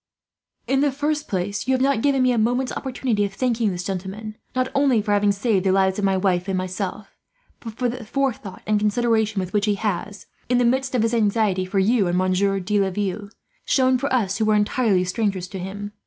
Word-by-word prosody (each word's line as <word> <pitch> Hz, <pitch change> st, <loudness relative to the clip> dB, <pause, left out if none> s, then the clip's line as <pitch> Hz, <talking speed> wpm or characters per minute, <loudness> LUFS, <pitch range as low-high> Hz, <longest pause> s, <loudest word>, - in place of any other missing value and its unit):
"In 270 Hz, +1 st, +1 dB
the 290 Hz, -1 st, +2 dB
first 295 Hz, +2 st, -2 dB
place, 200 Hz, +4 st, -3 dB
you 260 Hz, -, +3 dB
have -, -, -1 dB
not 270 Hz, -3 st, +2 dB
given 275 Hz, -1 st, +2 dB
me 255 Hz, -, +3 dB
a 240 Hz, -, 0 dB
moment's 245 Hz, +4 st, +1 dB
opportunity 250 Hz, -5 st, -1 dB
of 200 Hz, -1 st, -3 dB
thanking 235 Hz, -3 st, +1 dB
this 180 Hz, -1 st, -4 dB
gentleman; 195 Hz, +3 st, -5 dB, 0.2 s
not 255 Hz, 0 st, +1 dB
only 275 Hz, -4 st, +3 dB
for 210 Hz, 0 st, -2 dB
having 205 Hz, 0 st, +3 dB
saved 200 Hz, -1 st, 0 dB
the 190 Hz, -, +2 dB
lives 190 Hz, 0 st, +2 dB
of -, -, -2 dB
my 195 Hz, -1 st, +2 dB
wife 185 Hz, -1 st, 0 dB
and 190 Hz, -1 st, -1 dB
myself, 185 Hz, +2 st, -4 dB, 0.4 s
but 230 Hz, -5 st, -8 dB
for 250 Hz, +1 st, 0 dB
the 245 Hz, 0 st, -5 dB
forethought 230 Hz, -5 st, -3 dB
and 215 Hz, -1 st, +2 dB
consideration 220 Hz, 0 st, +1 dB
with 185 Hz, -1 st, -4 dB
which 210 Hz, 0 st, +1 dB
he 205 Hz, -, +2 dB
has, 200 Hz, -1 st, -3 dB, 0.2 s
in 250 Hz, -, +3 dB
the 245 Hz, -, +3 dB
midst 260 Hz, +2 st, +1 dB
of 235 Hz, -, +2 dB
his 230 Hz, +1 st, 0 dB
anxiety 210 Hz, -4 st, +1 dB
for 190 Hz, +2 st, -3 dB
you 200 Hz, +1 st, +3 dB
and 175 Hz, +1 st, 0 dB
Monsieur 185 Hz, +2 st, +1 dB
de 205 Hz, +3 st, 0 dB
Laville, 200 Hz, +1 st, -2 dB, 0.3 s
shown 255 Hz, -1 st, +2 dB
for 280 Hz, +2 st, -2 dB
us 210 Hz, -5 st, 0 dB
who 220 Hz, -, +2 dB
were 215 Hz, 0 st, +3 dB
entire 210 Hz, -3 st, +2 dB
strangers 190 Hz, -1 st, -1 dB
to 190 Hz, -, -6 dB
him. 200 Hz, +3 st, -6 dB
210 Hz, 220 wpm, -22 LUFS, 195-245 Hz, 0.4 s, you